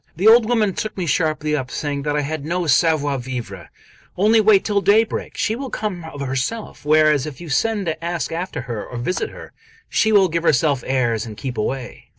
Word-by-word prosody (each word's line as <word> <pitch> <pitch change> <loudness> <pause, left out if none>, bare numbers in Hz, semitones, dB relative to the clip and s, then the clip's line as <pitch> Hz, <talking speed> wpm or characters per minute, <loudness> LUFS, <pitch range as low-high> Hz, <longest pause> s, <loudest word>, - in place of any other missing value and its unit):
The 185 +7 +1
old 225 0 +7
woman 215 -5 +2
took 215 +2 -4
me 185 - -2
sharply 155 -1 0
up, 130 -4 -3
saying 145 -1 -3
that 145 +1 -2
I 150 - +1
had 150 0 -4
no 175 +3 -2
'savoir 145 -2 +2
vivre:' 120 -7 -6 0.5
"Only 215 +4 +4
wait 210 -2 +4
till 205 -2 +1
daybreak, 220 +3 +2
and - - -15
she 220 - 0
will 265 +2 -5
come 190 -8 -4
of 145 -3 -8
herself; 135 - -3
whereas, 155 -2 +3
if 150 - -8
you 170 -2 -9
send 210 +7 0
to 160 0 -3
ask 170 0 -2
after 170 -4 -4
her 120 -4 -5
or 125 - -8
visit 125 +10 -2
her, - - -11 0.4
she 220 - +2
will 200 -3 +5
give 170 0 -1
herself 145 -4 +2
airs 120 -4 0
and 105 -2 -9
keep 130 0 -5
away." 125 +3 -4
155 Hz, 210 wpm, -20 LUFS, 135-195 Hz, 0.5 s, old